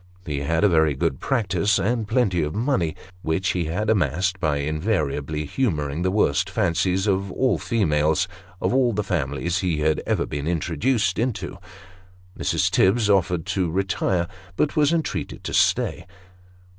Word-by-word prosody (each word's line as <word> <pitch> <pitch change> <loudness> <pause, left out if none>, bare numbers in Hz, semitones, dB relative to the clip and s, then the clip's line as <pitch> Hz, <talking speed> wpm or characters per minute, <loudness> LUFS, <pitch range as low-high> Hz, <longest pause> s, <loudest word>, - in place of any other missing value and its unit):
He 75 -4 -2
had 80 +6 0
a - - +7
very 80 -5 +3
good 65 0 -1
practice, 100 -6 +1
and 115 +1 0
plenty 105 -8 +1
of 75 +3 -2
money, 110 - 0 0.3
which 85 +3 0
he 90 -2 0
had 95 +8 -2
amassed 95 -2 +1
by 75 -4 +1
invariably 75 -1 -1
humouring 75 - -1
the 95 - +1
worst 95 -7 +1
fancies 95 +3 +1
of 100 -1 0
all 130 +6 +1
the - - -9
females 80 -5 +1 0.3
of - - 0
all 125 -3 +3
the 105 +1 -1
families 85 +1 -1
he 85 -5 -1
had 80 0 +1
ever - - +1
been 70 +1 -4
introduced 90 - 0
into. 120 -1 -2 0.8
Mrs. - - 0
Tibbs 105 +2 +3
offered 90 -4 +1
to 95 -3 -1
retire, 90 -1 0 0.3
but 150 - 0
was 150 -1 +3
entreated 165 -2 -2
to - - -5
stay. - - +1
90 Hz, 155 wpm, -23 LUFS, 80-105 Hz, 0.8 s, a